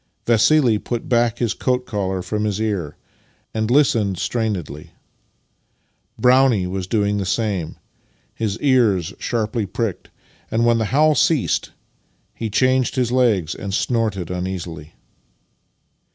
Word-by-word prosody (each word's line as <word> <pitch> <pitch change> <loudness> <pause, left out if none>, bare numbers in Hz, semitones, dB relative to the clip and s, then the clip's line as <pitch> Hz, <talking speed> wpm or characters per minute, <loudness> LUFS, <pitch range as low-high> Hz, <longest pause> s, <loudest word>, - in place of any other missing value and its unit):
Vassili 115 0 +4
put 120 +1 -4
back 120 -1 +2
his 120 -3 0
coat 125 -1 -1
collar 95 -4 -2
from 105 +3 -2
his 105 -1 -1
ear 100 -9 -2 0.6
and 110 0 -1
listened 115 -8 +2
strainedly. 90 - -3 1.2
Brownie 125 -6 +4
was 90 0 -4
doing 105 -1 0
the 100 - -2
same, 100 -6 -2 0.6
his 105 -2 -2
ears 115 - +2
sharply 110 -2 -2
pricked, 105 0 -4 0.4
and 115 +1 +1
when 115 -1 +3
the 110 - 0
howl 150 +7 +3
ceased 160 -4 +1 0.6
he 115 - -4
changed 130 +4 +2
his 125 -3 0
legs 110 -10 +2
and 100 -1 -4
snorted 110 -9 -1
imeasily. 90 -4 -5
110 Hz, 125 wpm, -20 LUFS, 95-120 Hz, 1.2 s, Vassili